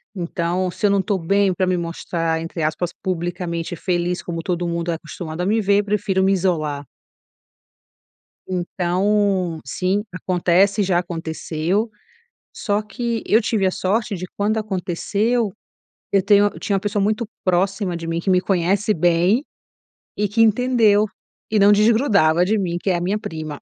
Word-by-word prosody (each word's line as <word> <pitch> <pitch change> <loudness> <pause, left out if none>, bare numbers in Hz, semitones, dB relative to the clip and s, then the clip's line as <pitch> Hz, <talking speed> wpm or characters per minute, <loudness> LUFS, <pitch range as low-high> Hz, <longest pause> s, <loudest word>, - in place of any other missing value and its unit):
Então 175 0 -1
"se 180 - -3
eu - - +5
não 200 - +3
estou 195 0 0
bem 195 +2 +2
para 185 - 0
me 185 0 +1
mostrar", 165 -1 -2
entre 165 0 -5
aspas, 155 +3 -1
"publicamente 175 -1 -3
feliz, 175 0 -1
como 165 -1 -5
todo 175 -2 -1
mundo 170 0 -2
é - - -1
acostumado 160 +1 -7
a - - 0
me 215 +3 +2
ver, 200 +1 +3
prefiro 200 -2 0
me 195 - +3
isolar". 155 -6 -1 1.6
Então 185 0 0
sim, 190 +3 -1
acontece, 185 +3 +2
já 185 -3 +2
aconteceu. 170 +4 -2 0.6
Só 205 0 -1
que 230 +2 -3
eu 220 - +4
tive 210 -3 +1
a - - +3
sorte 205 +4 -1
de 185 -1 -5
quando 210 +2 0
aconteceu, 210 +3 -1 0.6
eu 195 -1 +4
tenho 205 +1 +5
eu 205 - -4
tinha 200 - -2
uma 195 - -1
pessoa 205 0 -1
muito 215 +3 0 0.2
próxima 185 0 0
de 165 -1 -6
mim, 165 0 -2
que 190 - -1
me 185 - +4
conhece 195 +3 +1
bem 175 - +2 0.7
e 210 -1 0
que 225 +3 +2
entendeu 220 -2 +4 0.4
e 215 - +2
não 205 +1 +6
desgrudava 205 - +4
de 215 +4 +1
mim, 175 -3 -1
que 195 - -1
é 180 - +2
a - - -2
minha 195 +4 0
prima. 155 -5 -6
185 Hz, 165 wpm, -21 LUFS, 170-205 Hz, 1.6 s, não